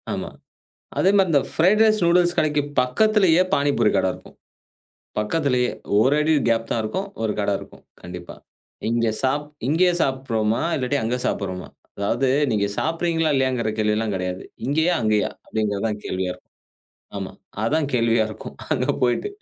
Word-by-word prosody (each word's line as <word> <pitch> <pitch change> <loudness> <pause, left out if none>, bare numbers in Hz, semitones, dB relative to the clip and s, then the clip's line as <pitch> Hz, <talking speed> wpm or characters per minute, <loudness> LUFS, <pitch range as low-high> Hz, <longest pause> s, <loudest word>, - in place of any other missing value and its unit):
ஆமா. - - -3 0.7
அதே 190 - +4
மாரி 190 -1 +4
இந்த 140 - +5
ஃபரைட் 190 +6 +3
ரைஸ், 215 -1 +3
நூடுல்ஸ் 175 0 +3
கடைக்கு 150 -1 +2 0.2
பக்கத்திலயே, 185 - +3
பானிபூரி 140 -6 +2
கட 95 - +2
இருக்கும். - - -14 0.8
பக்கத்திலேயே, 125 +2 +1 0.3
ஒரு 130 +6 +4
அடி 155 +1 +2 0.2
கேப் 115 0 +1
தான் 115 - +1
இருக்கும். 190 - -3
ஒரு 110 -1 0
கட 100 - 0
இருக்கும். - - -13 0.2
கண்டிப்பா. 90 0 -9 0.5
இங்க 115 0 +1
சாப் 140 +3 +1 0.2
இங்கயே 175 +4 +3
சாப்டுறோமா, 115 -6 0
இல்லாட்டி 135 +1 0
அங்க 120 +3 0
சாப்டுறோமா? 95 -3 -3 0.3
அதாவது 115 +6 0 0.2
நீங்க 105 -2 +1
சாப்பிட்றீங்களா 165 0 0
இல்லையாங்கிற 130 -4 +1
கேள்விலாம் 105 0 +1
கெடையாது. 90 0 -3 0.2
இங்கயா? 160 +6 +2
அங்கயா? 110 -1 +2 0.2
அப்டிங்கிறது 105 -2 -2
தான் 105 -1 -3
கேள்வியா 95 0 -2
இருக்கும். - - -18 0.6
ஆமா. - - -5 0.3
அதான் 145 +6 +1
கேள்வியா 115 -1 +3
இருக்கும் 110 - -9 0.2
அங்க - - 0 0.2
போயிட்டு. 125 - +1
125 Hz, 145 wpm, -22 LUFS, 110-160 Hz, 0.8 s, இந்த